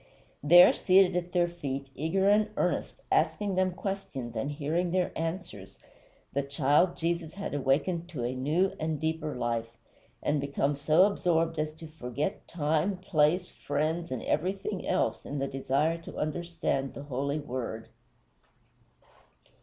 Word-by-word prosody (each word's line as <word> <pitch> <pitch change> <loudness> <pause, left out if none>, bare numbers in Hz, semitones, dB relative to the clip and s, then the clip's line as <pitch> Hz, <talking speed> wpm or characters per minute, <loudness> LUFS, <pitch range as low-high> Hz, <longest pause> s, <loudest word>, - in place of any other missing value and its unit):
There, 175 +5 +8
seated 185 -1 +4
at 180 0 -2
their 175 -1 +3
feet, 140 -6 -4
eager 185 +6 0
and 210 +1 +4
earnest, - - -1
asking 205 -2 +2
them 185 0 +2
questions 175 - -5
and 115 +6 -2
hearing 160 +4 -1
their 180 0 +1
answers, 160 - -5 0.6
the 140 - +1
child 140 +5 +2
Jesus 165 0 -2
had 200 -5 -5
awakened 155 +5 0
to 145 -8 -4
a 120 +2 -1
new 155 +9 +1
and 155 -1 -2
deeper 160 -1 -2
life, 115 -1 -2 0.5
and 145 -1 +1
become 140 0 0
so 155 +5 +4
absorbed 165 -5 +1
as 155 0 0
to 160 +1 -11
forget 155 - -4
time, 160 +4 0
place, 180 -1 +2
friends, 155 +3 -2
and 130 -3 -3
everything 190 +4 -2
else 110 - 0
in 145 - -5
the 135 0 -1
desire 140 +5 0
to 165 - -10
understand 155 -4 -2
the 140 - -7
Holy 140 +1 -2
Word. 125 -6 -5
155 Hz, 145 wpm, -29 LUFS, 140-175 Hz, 0.6 s, There